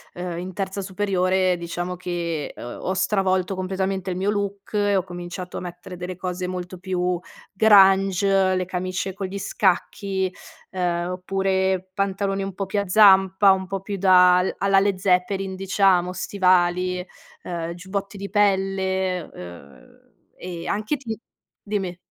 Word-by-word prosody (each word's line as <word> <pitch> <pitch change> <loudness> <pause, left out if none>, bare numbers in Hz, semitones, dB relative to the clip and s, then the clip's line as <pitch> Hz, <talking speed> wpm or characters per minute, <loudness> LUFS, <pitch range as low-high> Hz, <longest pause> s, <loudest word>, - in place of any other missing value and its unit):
uhm, 175 -1 -4
in 180 +2 -5
terza 195 +1 -4
superiore, 185 -1 +1
diciamo 175 +1 -4
che 170 -4 -4
ho 120 - -7
ho 185 - -1
stravolto 190 -1 +1
completamente 190 0 -2
il 180 - -3
mio 195 +2 0
look 200 -1 -3
e 205 -1 +2
ho 185 - +1
cominciato 175 0 -7
a - - -5
mettere 180 0 -8
delle 180 0 -6
cose 180 -1 -4
molto 180 0 -6
più 180 -1 -1 0.4
grunge, 195 -2 +5
le 185 0 -1
camicie 185 +1 -3
con 195 0 -4
gli 200 +2 -6
scacchi, 190 0 0 0.4
ehm, 175 -1 -1
oppure 190 0 -1
pantaloni 195 0 -1
un 195 0 -5
po' 195 +2 -3
più 195 +2 -1
a 200 - -6
zampa, 195 -1 +6
un 190 0 +1
po' 195 +1 -4
più 200 +2 -5
da 180 -1 +6
al 180 - 0
alla 195 0 +3
Led 200 -1 +1
Zeppelin, 190 +1 0
diciamo, 190 -2 +2
stivali, 180 -1 +1 0.4
eh, 170 -1 -4
giubbotti 195 +3 -5
di 200 0 -6
pelle, 190 -2 +1
uhm, 85 -6 -13 0.2
e 175 -2 -7
anche 215 +8 -1
ti 230 -5 -5 0.4
dimmi. 195 -4 -3
190 Hz, 150 wpm, -23 LUFS, 180-195 Hz, 0.4 s, zampa